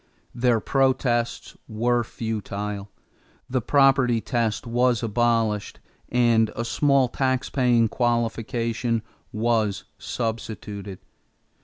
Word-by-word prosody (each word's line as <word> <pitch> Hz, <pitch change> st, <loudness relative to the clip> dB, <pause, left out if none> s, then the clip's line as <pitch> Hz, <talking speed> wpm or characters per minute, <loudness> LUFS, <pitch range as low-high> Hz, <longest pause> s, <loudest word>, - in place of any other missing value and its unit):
Their 120 Hz, -1 st, +2 dB
protests 125 Hz, -2 st, 0 dB
were 120 Hz, +2 st, +1 dB
futile. 105 Hz, -3 st, -4 dB, 0.6 s
The 130 Hz, 0 st, -1 dB
property 135 Hz, -2 st, +4 dB
test 115 Hz, -2 st, -1 dB
was 120 Hz, 0 st, +1 dB
abolished 115 Hz, -2 st, 0 dB, 0.3 s
and 115 Hz, -3 st, +3 dB
a 115 Hz, -, -3 dB
small 140 Hz, +1 st, +3 dB
tax 130 Hz, +1 st, -1 dB
paying 120 Hz, -4 st, +3 dB
qualification 115 Hz, 0 st, -1 dB, 0.3 s
was 110 Hz, -2 st, 0 dB, 0.2 s
substituted. 105 Hz, -4 st, -5 dB
115 Hz, 90 wpm, -24 LUFS, 110-125 Hz, 0.6 s, property